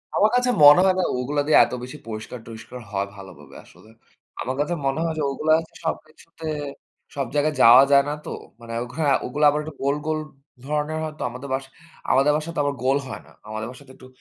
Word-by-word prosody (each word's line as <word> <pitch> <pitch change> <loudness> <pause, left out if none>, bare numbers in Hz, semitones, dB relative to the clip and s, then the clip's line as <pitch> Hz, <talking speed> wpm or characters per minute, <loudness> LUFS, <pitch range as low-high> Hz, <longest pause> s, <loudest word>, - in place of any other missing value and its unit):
আমার 210 - +4
কাছে 250 0 +2
মনে 145 +4 +10
হয় 185 -1 +3
না - - +2 0.2
ওগুলা 145 +3 -1
দিয়ে 155 - +6
এত - - -8
বেশি 130 +4 -8
পরিষ্কার-টরিস্কার 115 +2 -8
হয় 100 0 -1
ভালোভাবে 95 -2 -13
আসলে। 110 - -19 0.5
আমার 130 +2 -3
কাছে 150 +4 0
মনে 135 +3 0
হয় 165 -1 -1
যে - - 0
ওগুলা 155 +3 +1 0.3
সবকিছুতে 160 0 -6 0.7
সব 140 - -1
জায়গায় 150 +1 +1
যাওয়া 125 +4 +9
যায় 140 0 +6
না - - -1
তো। - - -6 0.3
মানে 115 0 -8
অঘরা 140 +5 -3 0.2
ওগুলা 150 +4 0
আবার 150 +1 0
একটু 155 0 -8
গোল, 140 +1 +2
গোল 155 0 0 0.5
ধরনের 150 +2 -2
হয়তো। 155 -1 -6
আমাদের 125 +3 -8
বাসায় 135 0 -4 0.4
আমাদের 135 +3 +4
বাসায় 155 +2 -3
তো - - -2
আবার 145 0 -1
গোল 135 +2 +3
হয় - - -7
না। - - -18 0.2
আমাদের 110 +1 -4
বাসাতে 130 +1 -14
একটু 130 - -15
140 Hz, 200 wpm, -23 LUFS, 125-155 Hz, 0.7 s, মনে